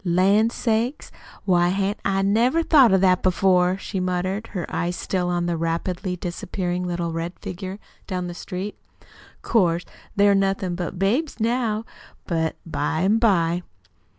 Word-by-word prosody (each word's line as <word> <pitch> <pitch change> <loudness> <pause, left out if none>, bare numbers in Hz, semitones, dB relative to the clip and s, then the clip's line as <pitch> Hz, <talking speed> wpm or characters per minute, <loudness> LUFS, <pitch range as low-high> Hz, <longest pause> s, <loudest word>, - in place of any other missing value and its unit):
"Lan' 195 +5 +3
sakes, 235 +3 -1 0.3
why 175 -3 +3
hain't 195 +2 -1
I 195 0 +1
never 235 +11 +3
thought 275 - +6
of 190 -1 +4
that 185 -1 +4
before?" 185 0 +3
she 195 0 -4
muttered, 185 +4 -2
her 180 -6 -4
eyes 175 0 -2
still 180 -1 -2
on 175 -1 0
the 175 -1 0
rapidly 175 +3 -2
disappearing 180 +1 -3
little 170 -1 -2
red 165 +2 -3
figure 185 +1 -6 0.3
down 185 -2 -2
the 175 - -5
street. 190 +3 -6
"Oh, - - -31 0.4
'course 175 -6 +2 0.3
they're 200 0 +5
nothin' 195 -2 0
but 175 0 -4
babies 235 - 0
now, 225 -1 0 0.4
but 160 -2 -1
by 160 -1 -1
an' 205 +4 +3
by 175 -6 +2
185 Hz, 150 wpm, -23 LUFS, 175-205 Hz, 0.4 s, thought